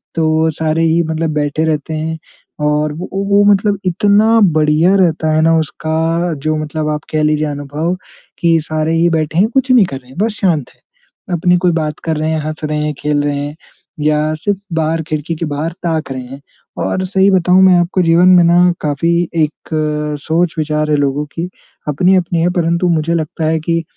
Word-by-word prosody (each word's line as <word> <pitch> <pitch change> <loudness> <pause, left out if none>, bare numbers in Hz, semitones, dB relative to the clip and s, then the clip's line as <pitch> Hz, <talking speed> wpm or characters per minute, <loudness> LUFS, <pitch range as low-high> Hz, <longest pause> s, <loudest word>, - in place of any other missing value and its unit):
तो 160 0 +2
सारे 160 +1 -1
ही 165 +1 +2
मतलब 160 0 -2
बैठे 150 +1 -1
रहते 155 0 -2
हैं 160 +1 -3 0.5
और 150 0 0
वो 170 +4 -7 0.2
वो 205 0 +4
मतलब 200 0 0
इतना 205 +5 +3 0.2
बढ़िया 155 +5 +3
रहता 160 -4 +1
है 155 - +3
ना 165 0 +3
उसका 160 +3 -1
जो 155 0 +1
मतलब 155 0 -3
आप 150 0 -2
कह 155 0 0
लीजिए 150 0 +1
अनुभव 145 +4 -3 0.4
कि 165 -1 +3
सारे 155 +1 -2
ही 170 +1 +3
बैठे 160 0 -1
हैं। 205 - +4
कुछ 265 0 +1
नहीं 240 -6 +6
कर 135 -6 -6
रहे 125 -1 -17
हैं। 130 - -15
बस 220 +2 +1
शांत 160 -9 +1
हैं। - - -35 0.6
अपनी 180 +2 +3
कोई 175 0 +2
बात 155 -2 -2
कर 160 -1 -1
रहे 155 +1 -1
हैं, 160 - 0
हँस 155 0 -6
रहे 150 0 -2
हैं, 150 - -2
खेल 145 0 0
रहे 145 -1 -1
हैं 145 +1 -5 0.5
या 150 +1 +1
सिर्फ 195 +6 -2 0.2
बाहर 160 0 0
खिड़की 155 +2 -3
के 165 - -3
बाहर 150 +2 -3
ताक 160 -4 -2
रहे 130 -1 -4
हैं। 135 +3 -11 0.4
और 185 - -1
सही 190 +1 +2
बताऊँ 185 0 +4
मैं 185 -1 +6
आपको 175 +2 0
जीवन 170 +2 +4
में 180 -2 +6
ना 175 +1 +4
काफ़ी 150 +3 0 0.2
एक 155 -2 -2 0.5
सोच-विचार 155 -2 0
है। 150 - +3
लोगों 145 +1 0
की 170 +2 -3 0.4
अपनी-अपनी 175 +2 +2
है 175 - +2
परंतु 170 +1 +1
मुझे 165 0 0
लगता 160 0 -3
है 160 0 +1
कि 165 +1 -1
160 Hz, 195 wpm, -15 LUFS, 150-175 Hz, 0.6 s, नहीं